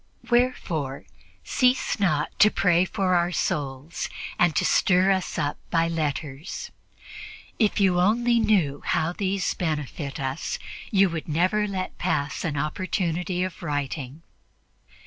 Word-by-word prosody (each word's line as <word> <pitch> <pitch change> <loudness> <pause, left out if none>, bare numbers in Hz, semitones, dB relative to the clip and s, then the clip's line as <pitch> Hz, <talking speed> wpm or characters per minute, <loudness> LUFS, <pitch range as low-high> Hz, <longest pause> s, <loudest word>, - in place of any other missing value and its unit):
Wherefore 175 - 0 0.4
cease 250 - +1
not 155 -7 +1
to 210 - +8
pray 180 -3 +3
for 185 -1 0
our 175 0 +2
souls 145 -1 -2 0.3
and 160 -4 +3
to - - +2
stir 185 +1 +4
us 190 -2 -1
up 145 0 -1
by 165 0 +2
letters; 155 -1 -3 0.9
if 215 -3 +2
you 185 -3 +3
only 235 +5 +3
knew 180 -11 +2
how 160 +2 0
these 195 0 -1
benefit 150 -3 -3
us, 135 +2 -3 0.3
you 195 -1 +4
would 165 -2 -4
never 185 +7 +1
let 190 -2 -4
pass 150 -5 -1
an 150 -4 -2
opportunity 175 +3 -1
of 185 -1 -5
writing. 145 -1 -4
175 Hz, 125 wpm, -25 LUFS, 150-195 Hz, 0.9 s, to